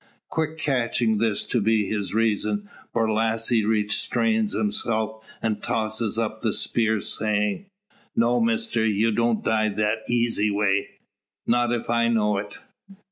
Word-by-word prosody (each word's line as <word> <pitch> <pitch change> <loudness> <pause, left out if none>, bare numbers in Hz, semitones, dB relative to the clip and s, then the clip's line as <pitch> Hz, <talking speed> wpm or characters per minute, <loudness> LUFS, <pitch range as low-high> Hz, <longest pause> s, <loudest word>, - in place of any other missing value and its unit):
Quick 160 0 -2
catching 120 -6 +1
this 110 -2 +1
to 120 - 0
be 110 0 +2
his 100 0 -2
reason, 105 -2 0 0.2
Borlasse 115 0 +1
restrains 160 - +1
himself, 110 - -1 0.2
and 110 -2 -1
tosses 110 0 -1
up 110 -1 -2
the 110 -3 0
spear, 110 -3 +1
saying: 105 - -1 0.5
"No, 120 +1 +3
Mister; 115 0 +1
ye 110 +1 +2
don't 115 0 +1
die 110 -1 +2
that 105 +2 0
eesy 115 -3 +1
way 100 -1 +1 0.6
not 120 0 +2
if 120 -1 -2
I 115 0 +2
know 105 -3 +2
it. 100 0 -7
110 Hz, 135 wpm, -24 LUFS, 105-115 Hz, 0.6 s, No